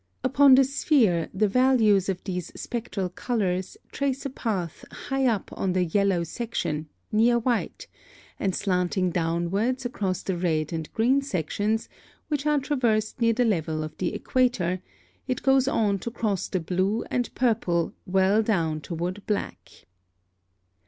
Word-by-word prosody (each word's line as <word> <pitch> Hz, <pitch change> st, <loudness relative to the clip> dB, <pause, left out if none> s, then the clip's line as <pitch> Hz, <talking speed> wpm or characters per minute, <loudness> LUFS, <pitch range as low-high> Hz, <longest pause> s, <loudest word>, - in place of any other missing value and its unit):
Upon 270 Hz, +1 st, +6 dB
the 270 Hz, -, +6 dB
sphere 245 Hz, -, +2 dB
the 210 Hz, +2 st, +2 dB
values 220 Hz, -4 st, +3 dB
of 185 Hz, -2 st, -3 dB
these 180 Hz, -3 st, -4 dB
spectral 225 Hz, -5 st, -3 dB
colors 185 Hz, -2 st, -2 dB
trace 275 Hz, -1 st, -2 dB
a 275 Hz, -, -3 dB
path 195 Hz, -, -3 dB
high 270 Hz, -1 st, -1 dB
up 220 Hz, -5 st, -1 dB
on 190 Hz, -2 st, -1 dB
the 180 Hz, -1 st, +2 dB
yellow 190 Hz, 0 st, +1 dB
section, 160 Hz, -6 st, -3 dB, 0.2 s
near 230 Hz, +3 st, +4 dB
white, 235 Hz, 0 st, -1 dB, 0.5 s
and 190 Hz, -2 st, 0 dB
slanting 180 Hz, -1 st, 0 dB
downward 180 Hz, +10 st, 0 dB
across 200 Hz, -8 st, -2 dB
the 190 Hz, -, -2 dB
red 160 Hz, -3 st, -1 dB
and 160 Hz, -1 st, -4 dB
green 255 Hz, +5 st, +3 dB
sections, 210 Hz, -, -1 dB, 0.4 s
which 295 Hz, -1 st, -1 dB
are 300 Hz, 0 st, +3 dB
traversed 240 Hz, -6 st, 0 dB
near 230 Hz, 0 st, +4 dB
the 245 Hz, +2 st, +2 dB
level 160 Hz, -7 st, 0 dB
of 155 Hz, 0 st, -7 dB
the -, -, -1 dB
equator, 190 Hz, -9 st, 0 dB, 0.5 s
it 255 Hz, -, -2 dB
goes 270 Hz, -1 st, +4 dB
on 210 Hz, -9 st, +1 dB
to 235 Hz, -, -4 dB
cross 215 Hz, -5 st, -2 dB
the 185 Hz, -, -1 dB
blue 185 Hz, +6 st, 0 dB
and 245 Hz, -1 st, -1 dB
purple 210 Hz, -9 st, +1 dB
well 190 Hz, +3 st, +3 dB
down 165 Hz, -8 st, 0 dB
toward 175 Hz, +6 st, -4 dB
black. 210 Hz, -, -4 dB
205 Hz, 145 wpm, -26 LUFS, 180-245 Hz, 0.5 s, Upon